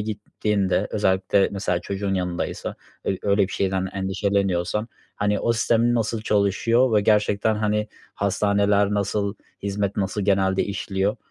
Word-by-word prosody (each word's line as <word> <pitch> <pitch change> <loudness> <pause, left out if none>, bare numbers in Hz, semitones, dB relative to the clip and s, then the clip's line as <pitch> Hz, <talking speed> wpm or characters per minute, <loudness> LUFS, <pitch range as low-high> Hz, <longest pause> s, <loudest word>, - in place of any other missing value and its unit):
gittiğinde 105 -2 -1
özellikle 95 -1 +2
mesela 90 -3 -1
çocuğun 100 +1 -2
yanındaysa 90 -2 -3 0.3
öy 95 - -1
öyle 100 0 +3
bir - - -9
şeyden 95 -1 0
endişeleniyorsan, 100 +1 0 0.3
hani, 105 0 0
o 115 - +2
sistemin 115 +1 +2
nasıl 115 -1 -1
çalışıyor 110 +4 +2
ve 105 - +5
gerçekten, 105 +1 +2
hani, 105 0 0 0.3
hastaneler 100 0 +2
nasıl 100 0 -1 0.3
hizmet 100 0 -2
nasıl 100 +1 -1
genelde 95 -1 +2
işliyor, 100 +1 -2
100 Hz, 125 wpm, -23 LUFS, 95-105 Hz, 0.3 s, ve